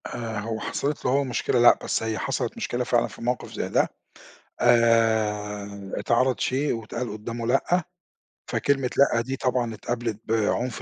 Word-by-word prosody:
آآ، 115 -3 -4
هو 110 +1 -3
حصَلِت 145 +1 -3
له 125 - +2
هو 140 +2 +3
مشكلة 125 -1 0
لأ، 120 - +7
بس - - -1
هي 110 -1 -2
حصَلِت - - -2
مشكلة 125 +1 -2
فعلًا 120 -1 +2
في - - -13
موقف 125 +1 -2
زي - - -3
ده، - - +3 0.7
آآ 105 -4 +2
اتعرض 130 +2 +2
شئ 140 +3 0
واتقال 115 +1 -4
قدّامه 115 +2 -5
لأ، 175 +8 +2 0.7
فكلمة 135 -3 +1
لأ 135 -4 +4
دي 130 +3 -3
طبعًا 125 -3 0
اتقابلت 115 0 -3
بعنف 115 +2 0
120 Hz, 155 wpm, -25 LUFS, 110-125 Hz, 0.7 s, لأ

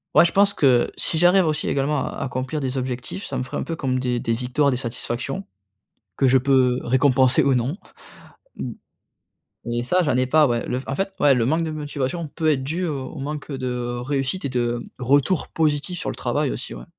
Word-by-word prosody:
ouais, - - +8
je 170 - +1
pense 200 0 +4
que 130 -8 +3
si 160 - 0
j'arrive 180 +1 +5
aussi, 155 -2 -1
également, 140 0 0
à - - -6
accomplir 130 +3 -3
des 130 0 -2
objectifs, 130 +8 -4
ça - - -5
me - - -1
ferait 130 - -5
un - - -2
peu 165 - -4
comme 130 -5 -1
des 125 -1 -1
des 115 - -1
victoires, 125 +5 +1
des 130 - 0
satisfactions, 125 +7 -4 0.8
que 135 - +4
je 130 - +5
peux 130 -1 +3
récompenser 130 0 +4
ou 135 -2 +3
non. 125 +7 0 0.8
M - - -4 0.9
mais 120 0 -2
ça, 180 +8 +2
j'en 145 -6 +1
ai 130 0 +2
pas, 150 +3 +4
ouais. 120 -2 -1
Le 125 - -1
f - - -12
en 135 - -1
fait, 195 0 -2
ouais, 145 -2 +6
le 115 -2 +1
manque 160 +5 +1
de 160 - -3
motivation 150 +1 -3
peut 160 +2 -2
être 135 -3 +1
dû 165 +7 -2
au 135 -4 -3
au 150 - -9
manque 150 +2 -5
de 125 -2 -3
réussite, 135 +6 -2
et 140 - 0
de 120 -1 -1 0.2
retour 140 +7 +2
positif 155 +2 0
sur - - -2
le - - -7
travail - - -1
aussi, - - -5
ouais. - - -9
135 Hz, 220 wpm, -22 LUFS, 125-155 Hz, 0.9 s, ouais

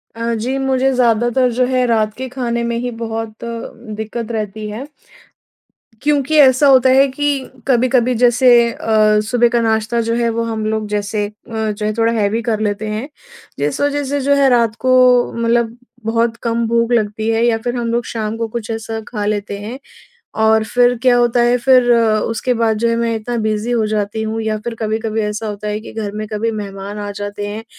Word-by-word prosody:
अ, 230 0 -2
जी, 250 +5 -2
मुझे 265 0 +1
ज़्यादातर 240 +1 +2
जो 250 +1 +2
है 255 -1 +1
रात 215 -2 +1
के 260 0 -4
खाने 235 -2 -2
में 235 0 -1
ही 245 0 -3
बहुत 225 -1 -4
दिक्कत 230 -1 -6
रहती 215 -1 -4
है। 245 +7 -6 1.1
क्योंकि 295 +1 +1
ऐसा 265 +1 +6
होता 260 -1 +6
है 270 +2 +5
कि 280 0 -2 0.2
कभी-कभी 250 -1 +2
जैसे 245 +2 +4 0.2
अ, 215 -1 +2
सुबह 240 -1 +3
का 235 -1 +1
नाश्ता 220 +1 0
जो 230 0 -1
है 235 -1 +1
वो 230 0 -1
हम 220 -1 -3
लोग 215 -1 -1
जैसे 205 0 -1
अ, - - -13 0.4
जो 210 +1 -4
है 215 - 0
थोड़ा 230 0 +2
हैवी 220 +1 0
कर 220 -2 -1
लेते 215 0 -2
हैं, 220 +6 -4 0.5
जिस 145 - -1
वजह 290 0 0
से 285 +1 -2
जो 285 +2 +2
है 275 -1 +4
रात 235 -3 +2
को 255 0 +4
मतलब 235 0 0 0.3
बहुत 230 +1 +1
कम 230 0 0
भूख 235 +1 +1
लगती 215 -1 0
है 225 +1 +1
या 230 -2 +2
फिर 240 +2 -3
हम 235 -1 -2
लोग 235 0 -1
शाम 220 -1 -3
को 230 -1 -2
कुछ 230 0 -6
ऐसा 225 0 -4
खा 210 -4 -4
लेते 205 -1 -2
हैं, 230 +6 -7 0.6
और 220 0 +3
फिर 245 +1 +2
क्या 250 -1 +4
होता 240 0 +2
है 240 +1 +3
फिर 250 -1 +4
उसके 225 +1 +1
बाद 225 -1 +1
जो 235 +1 +1
है 230 - +1
मैं 230 -1 0
इतना 235 +2 -4
बिज़ी 215 +2 -1
हो 225 -3 +1
जाती 210 0 -2
हूँ 220 +1 -3
या 220 0 -1
फिर 235 -1 -3
कभी-कभी 220 0 -1
ऐसा 210 +1 -3
होता 210 0 -5
है 210 +1 -2
कि - - -11
घर 210 -2 -4
में 215 0 -4
कभी 225 +2 -1
मेहमान 200 -1 -6
आ 205 0 -4
जाते 205 0 -5
हैं, 215 +2 -6
230 Hz, 205 wpm, -17 LUFS, 215-245 Hz, 1.1 s, ऐसा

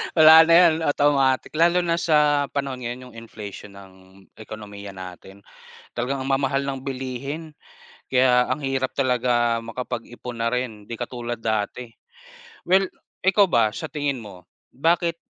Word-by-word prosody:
Wala 160 0 +8
na 165 - +5
yan 170 -2 +7
automatic, 140 -2 +2
lalo 170 +3 +3
na 170 0 0
sa 150 -3 +3
panahon 135 -2 -4
ngayon 125 +1 -7
yung - - -19
inflation 105 -3 -10
ng 95 -1 -14 0.5
ekonomiya 105 -2 -9
natin, 95 +2 -11 0.5
talagang 125 +3 -2
ang 130 - -5
mamahal 135 0 +1
ng 135 -1 -4
bilihin, 135 +4 -6 0.6
kaya 125 -1 +3
ang 130 - -1
hirap 135 -2 -2
talaga 120 -3 +1
makapag-ipon 120 +1 -6
na 115 - 0
rin, 120 -4 -3
'di 115 - -6
katulad 120 -1 -5
dati. 110 +2 -2 0.8
Well, 190 +1 +3 0.3
ikaw 195 +2 +4
ba 115 - +2
sa 105 - -6
tingin 145 -3 -3
mo 100 -5 -11 0.3
bakit 165 +3 0
130 Hz, 140 wpm, -23 LUFS, 115-145 Hz, 0.8 s, Wala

